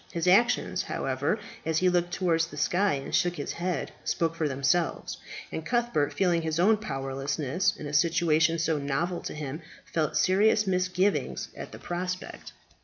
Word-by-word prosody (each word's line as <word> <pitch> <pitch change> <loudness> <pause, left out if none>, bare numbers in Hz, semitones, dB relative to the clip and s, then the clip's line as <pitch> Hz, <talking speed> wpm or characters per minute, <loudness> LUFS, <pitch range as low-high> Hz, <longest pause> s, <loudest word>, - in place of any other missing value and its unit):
His 170 +1 -2
actions, 235 +7 +3
however, - - -1 0.3
as 160 -1 0
he 185 - +3
looked 175 -1 +2
towards 170 -3 +1
the - - -11
sky, 195 +3 +2
and 135 0 -6
shook 175 0 +2
his 145 - -4
head, 175 -3 -2
spoke 165 -1 0
for 165 -2 -1
themselves, 140 +5 0 0.3
and 160 - -4
Cuthbert, 235 -10 +1
feeling 175 -3 +2
his 160 0 -2
own 215 +5 +5
powerlessness 145 +2 -1
in 150 - -7
a 145 - -5
situation 165 0 +3
so 160 -2 0
novel 160 +6 -1
to - - -6
him, 150 +1 -5 0.2
felt 155 -3 -1
serious 210 +3 +4
misgivings 185 +1 0
at - - -8
the - - -9
prospect. 180 +1 -5
170 Hz, 165 wpm, -28 LUFS, 155-185 Hz, 0.3 s, own